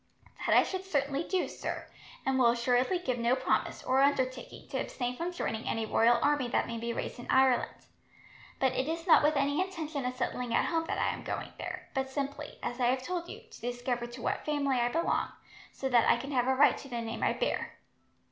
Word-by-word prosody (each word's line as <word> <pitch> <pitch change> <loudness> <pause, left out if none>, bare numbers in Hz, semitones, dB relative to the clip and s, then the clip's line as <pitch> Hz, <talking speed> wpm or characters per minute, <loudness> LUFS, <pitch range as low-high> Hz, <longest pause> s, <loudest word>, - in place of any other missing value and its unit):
"That - - +5
I - - +7
should 375 -1 -4
certainly 285 -4 0
do, 370 +1 0
sir; - - -5 0.4
and 265 -1 +2
will 250 - +6
assuredly 245 +7 +2
give 255 -9 -2
no 235 +2 +3
promise, 260 0 0
or 260 +1 +3
undertaking, 260 -2 0
to - - -2
abstain 245 -1 -3
from 340 +6 -3
joining 225 -10 -3
any 225 -1 -1
royal 230 +2 +4
army 290 -3 +2
that 240 - +1
may 230 -1 -4
be 235 +1 -2
raised 235 - -4
in 240 - -9
Ireland. 260 -2 +4 0.9
But 265 -1 +3
it 260 - -1
is 330 +1 -3
not 345 - +7
with 300 +1 +3
any 285 +4 +2
intention 320 -7 -3
of 250 - -3
settling 250 -1 -2
at - - +3
home 330 -1 0
that - - -2
I - - +1
am - - -7
going - - -4
there, - - -6
but 265 -1 -1
simply, 285 +2 -4
as 245 - -3
I 245 - +3
have 255 +1 +1
told 345 +1 -3
you, - - -8
to - - -13
discover 245 0 -2
to 240 0 -9
what - - -1
family 280 -3 0
I 240 - +2
belong, 330 +7 0 0.4
so 270 - -3
that 240 -3 +4
I - - +5
can 270 +4 -6
have 250 -2 +1
a 265 - +3
right 265 - +5
to - - -10
the 240 -2 -3
name 225 0 -5
I - - +2
bear." - - -2
260 Hz, 225 wpm, -31 LUFS, 245-295 Hz, 0.9 s, I